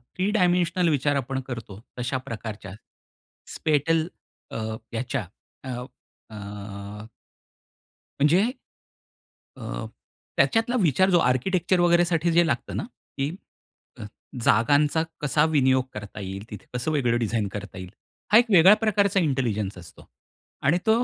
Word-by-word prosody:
3 190 +2 0
dimensional 180 -2 +2
विचार 145 -1 +1
आपण 135 0 -2
करतो 110 -6 -7 0.2
तशा 125 +2 -1
प्रकारच्या 110 -3 -6 0.8
स्पेटल 160 +2 +1 0.4
अ, - - -4 0.4
याच्या 115 -3 -2 0.4
अ, 130 - -7 0.6
अ 100 0 -8 1.1
म्हणजे 150 +6 +4 1.2
अ, - - -5 0.5
त्याच्यातला 225 +1 +2
विचार 180 +4 +3
जो 175 - +5
आर्किटेक्चर 175 +8 +1
वगैरेसाठी 175 -1 +3
जे 170 +1 +4
लागतं - - -2
ना - - -2 0.3
की 135 +2 0 0.7
अ, - - -6 0.4
जागांचा 145 +8 +3 0.2
कसा 150 +1 +2
विनियोग 130 -3 +3
करता 105 0 -8
येईल 95 +2 -6
तिथे, 105 - -9
कसं 125 +5 -2
वेगळं 125 -6 +1
डिझाइन 110 -2 0
करता 100 -1 -7
येईल? 90 -1 -7 0.4
हा 215 - +8
एक 245 - +3
वेगळ्या 190 +3 +8
प्रकारचा 205 -2 +2
इंटेलिजन्स 115 - -1
असतो. 85 -1 -13 0.5
आणि 155 +6 +3
तो 225 +2 +4
140 Hz, 125 wpm, -25 LUFS, 110-175 Hz, 1.2 s, हा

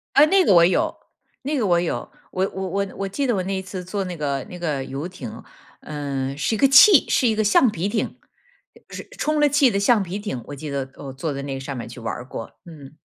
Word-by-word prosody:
哎， 290 - +8
那 380 +4 +4
个 200 - +4
我 170 -1 +7
有， 300 - +1 0.5
那 290 +3 -1
个 235 - 0
我 175 -2 +3
有。 175 - -3 0.2
我 190 +1 0
我 190 0 -4
我 200 +2 -1
我 195 - -2
记 275 +9 -2
得 245 - +1
我 190 - 0
那 195 +1 -2
一 190 - -2
次 190 -1 -7
坐 195 +2 -3
那 180 -2 -5
个 140 -4 -2
那 180 - -9
个 150 -6 -2
游 135 +5 -5
艇， 180 0 -9 0.4
嗯， 140 -2 -4
是 155 - -1
一 - - -3
个 275 - +5
气 275 +6 +7
是 250 - +3
一 220 - +2
个 215 - +1
橡 215 +4 +4
皮 180 +2 -2
艇， 215 - -3 0.7
是 - - -8
充 305 0 0
了 295 - +5
气 275 -3 +4
的 200 - 0
橡 210 +1 +3
皮 190 +2 -5
艇， 170 - -5
我 145 - -7
记 150 +2 -7
得 135 -2 -3
我 135 -2 -8
坐 140 +3 -3
在 140 - -5
那 135 -1 -4
上 135 +1 -6
面 120 - -5
儿 - - -11
去 125 - -10
玩 115 - -4
儿 120 - -7
过， 115 -4 -7
嗯。 150 -3 -13
180 Hz, 275 characters per minute, -22 LUFS, 140-215 Hz, 0.7 s, 哎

